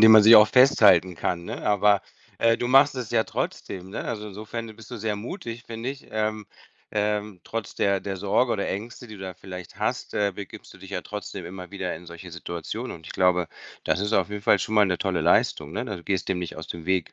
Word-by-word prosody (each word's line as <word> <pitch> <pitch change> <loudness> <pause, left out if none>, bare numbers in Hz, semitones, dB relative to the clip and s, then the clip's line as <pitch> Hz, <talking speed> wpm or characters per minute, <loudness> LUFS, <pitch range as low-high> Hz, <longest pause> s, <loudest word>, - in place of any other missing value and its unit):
dem 110 0 +9
man 110 -1 +9
sich 115 +2 +10
auch 105 0 +8
festhalten 95 - +6
kann, 85 +1 -2
ne? - - -6
Aber, 105 0 +4 0.4
äh, 115 0 +4
du 120 - -2
machst 135 +2 +6
es 125 -4 -5
ja 115 -2 +2
trotzdem, 95 -1 -4
ne? - - -5
Also, 105 -1 -4
insofern 110 +2 -7
bist 110 - -14
du 120 - -5
sehr 105 -1 -2
mutig, 115 - -7
finde 115 +2 -5
ich. 135 0 -10
Ähm, 110 -1 -2 0.5
ähm, 105 -2 -1
trotz 115 -3 -5
der 100 -1 +1
der 100 0 -4
Sorge 105 +6 +1
oder 100 - -1
Ängste, 115 +5 -5
die 110 - -9
du 95 - -13
da 95 -2 -6
vielleicht 90 -1 -10
hast, - - -2
äh, 100 -1 +1
begibst 100 -2 -9
dich 95 - -11
ja 95 - -2
trotzdem 100 -3 -7
immer 90 0 -8
wieder 95 -2 -3
in 90 - -13
solche 85 +1 -10
Situationen. 85 +8 -5
Und 80 - -15
ich - - -7
glaube, 90 -2 +2 0.4
das - - +1
ist 105 +2 -1
auf - - +2
jeden 105 -1 -5
Fall 100 - +5
schon 110 - -3
mal 105 -2 +6
'ne 90 -1 0
tolle 90 -3 0
Leistung, 85 - +2
ne? - - -2
Also, 85 - -6
gehst 95 -3 -1
dem 95 - 0
nicht 90 -2 -5
aus 80 0 -8
dem 85 0 -7
Weg. 95 -3 0
100 Hz, 235 wpm, -25 LUFS, 90-110 Hz, 0.5 s, sich